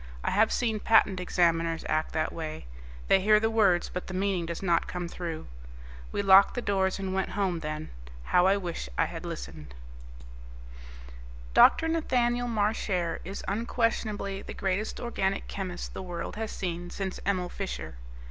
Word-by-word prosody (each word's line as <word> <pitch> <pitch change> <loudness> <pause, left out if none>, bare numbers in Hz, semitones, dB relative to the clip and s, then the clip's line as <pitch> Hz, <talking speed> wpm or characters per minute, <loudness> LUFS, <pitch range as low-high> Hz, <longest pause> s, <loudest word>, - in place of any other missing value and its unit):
I - - 0
have 215 +3 +3
seen 225 -3 0
Patent 205 -4 +4
Examiners 165 -2 +1
act 155 0 0
that 155 0 -1
way 155 - -6 0.4
they 195 - +5
hear 210 +2 +5
the 225 +1 +1
words, 195 -6 +3
but 180 - -6
the 185 - -5
meaning 190 -3 0
does 170 +2 -5
not 175 -3 +2
come 175 -1 -4
through. 170 -2 -5 0.7
We 200 - -1
locked 195 0 +7
the 245 - -1
doors 190 -2 +1
and 190 -1 -3
went 190 0 0
home, 185 -4 0
then. 155 0 -5 0.3
How 180 - +4
I 195 +1 +4
wish 175 - -5
I - - +3
had - - -7
listened! 65 0 -7 1.8
Dr. 325 - +6
Nathaniel 245 -7 +1
Marchare 205 -5 0
is 195 +3 -6
unquestionably 215 -2 -1
the - - -8
greatest 195 +3 -2
organic 195 -5 -1
chemist 185 -3 -5
the - - -5
world 175 -2 -5
has 220 0 -4
seen 175 -1 -4
since 190 0 -4
Emil 185 -2 0
Fischer. 190 - -5
190 Hz, 160 wpm, -28 LUFS, 175-210 Hz, 1.8 s, locked